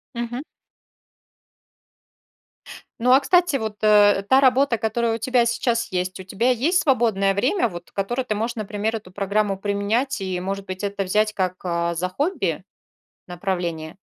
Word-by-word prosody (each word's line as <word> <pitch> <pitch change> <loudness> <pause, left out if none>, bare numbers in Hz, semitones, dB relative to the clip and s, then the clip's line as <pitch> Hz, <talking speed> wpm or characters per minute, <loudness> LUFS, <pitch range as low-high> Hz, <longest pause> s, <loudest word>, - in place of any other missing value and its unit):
Мгм. 240 +3 -4 2.6
Ну, 250 +2 +3
а, 260 - +7
кстати, 350 0 +2
вот, 220 -5 -3
э, 205 -2 +5
та 265 - +6
работа, 265 -2 +3
которая 225 +1 0
у - - -3
тебя 245 +1 +2
сейчас 235 -1 -1
есть, 185 0 -2
у - - -7
тебя 225 +7 0
есть 305 +10 +1
свободное 220 -8 +2
время, 250 - +1
вот, 175 -4 -10
которое 240 +6 -2
ты 215 -4 -2
можешь, 225 +3 -2
например, 215 0 -3
эту 205 -4 -8
программу 200 +1 -1
применять 205 +6 -1
и, 185 -2 -2
может 195 +2 -4
быть, 185 +1 -7
это 200 0 -2
взять 210 +3 +1
как, 185 -3 -1
а, 170 -1 -1
за 180 +2 -1
хобби, 195 - -2 0.6
направление? 175 -3 -4
210 Hz, 155 wpm, -22 LUFS, 190-240 Hz, 2.6 s, а